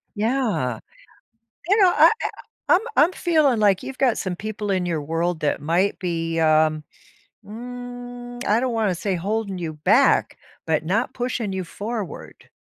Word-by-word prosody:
Yeah. 220 - 0 0.9
You 400 - +5
know, 375 - +7
I - - +7
I - - 0 0.5
I'm 355 - +4 0.2
I'm 325 +5 +5
feeling 310 -10 +2
like 200 -3 +3
you've 265 - -7
got 255 -4 +2
some 185 -2 -3
people 215 +1 -4
in 185 -2 0
your 165 -3 -2
world 165 +2 -1
that 145 - 0
might 170 +7 +1
be, 165 -3 -2
um, 155 -1 +3 0.6
mm, 245 +1 -8
I 210 +3 +3
don't 250 -1 -1
wanna 215 -5 +1
say 190 +2 -2
holding 200 +2 -2
you 165 -3 -4
back, 200 - +3 0.3
but 160 -1 0
not 210 +9 0
pushing 240 -4 -2
you 190 -1 -2
forward. 210 +3 -7
205 Hz, 155 wpm, -23 LUFS, 170-245 Hz, 0.9 s, know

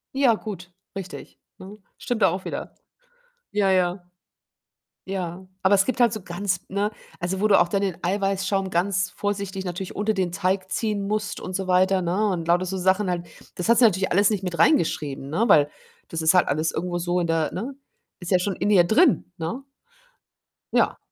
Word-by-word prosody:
Ja, 270 -4 +4
gut, 180 -5 -8 0.2
richtig, 190 -2 -8 0.2
ne? 195 +3 -11 0.2
Stimmt 240 -3 -3
da - - +6
auch 185 +2 -4
wieder. - - -6 0.8
Ja, 200 -2 +2
ja. 180 -1 +1 1.0
Ja, 185 -1 -4 0.2
aber 190 +2 +4
es 195 0 +4
gibt 255 -1 -1
halt 235 -2 +5
so 215 - -5
ganz, 180 +1 -3
ne 205 +2 -1 0.3
also, 185 +2 -2
wo 210 - +3
du 200 - +5
auch 175 - +1
dann 200 +1 0
den 190 -4 -1
Eiweißschaum 195 0 0
ganz 185 +1 0
vorsichtig 200 -1 -3
natürlich 180 +1 -5
unter 210 +2 0
den 185 -3 -1
Teig 190 0 -1
ziehen 205 -1 -1
musst 210 0 -2
und 185 - -6
so 195 - -2
weiter, 185 +1 +3
ne, 185 +5 0
und 170 -3 -3
lauter 175 +2 +2
so 190 +1 -4
Sachen 190 +2 +2
halt. 175 -1 -2 0.3
Das 180 +5 -3
hast 235 - +5
sie 245 - +7
natürlich 190 -2 +2
alles 200 +2 +4
nicht 200 -3 -2
mit 180 -2 -4
reingeschrieben, 145 - +1
ne, 190 +10 +1
weil 145 -1 +5 0.4
das 165 - -3
ist 160 +2 +4
halt 180 - +4
alles 155 +3 0
irgendwo 175 +1 -2
so 175 +1 0
in 170 - -1
der, 165 -2 0
ne 235 +9 -4 0.5
ist 175 0 -7
ja 185 - +5
schon 190 0 -2
in 200 +3 0
ihr 185 -4 +6
drin, 220 - +3
ne? 175 +11 -4 1.1
Ja, - - +2
190 Hz, 195 wpm, -24 LUFS, 175-205 Hz, 1.1 s, sie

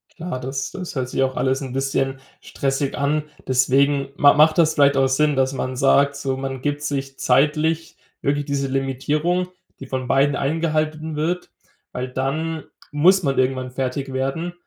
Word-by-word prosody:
Klar, 165 -6 -5
das 135 +1 -4
das 180 -4 -7
hört 130 -2 -2
sich 135 - 0
auch 130 0 -1
alles 130 +1 0
'n 130 -2 -6
bisschen 135 0 -1 0.2
stressig 135 0 -2
an. 150 +2 0 0.2
Deswegen 135 +2 +2
ma 145 0 +6
macht 155 +1 +4
das 160 -2 +4
vielleicht 140 -1 +4
auch 135 0 +4
Sinn, 145 +3 +2
dass 130 0 +1
man 130 -1 -3
sagt 140 +2 +3
so, 135 -2 -2
man 135 -1 -5
gibt 145 0 -2
sich 135 -2 -4
zeitlich 155 +3 +1 0.2
wirklich 145 +1 0
diese 140 -1 -1
Limitierung, 145 +7 -1 0.3
die 135 - -9
von 130 -1 -3
beiden 140 +2 +3
eingehalten 155 +1 -1
wird, 170 +4 -2 0.4
weil 125 +1 -4
dann 150 +5 -2 0.3
muss 180 +5 +4
man 135 -1 0
irgendwann 130 -1 0
fertig 135 +1 -3
werden. 135 +7 -2
140 Hz, 170 wpm, -22 LUFS, 135-155 Hz, 0.4 s, ma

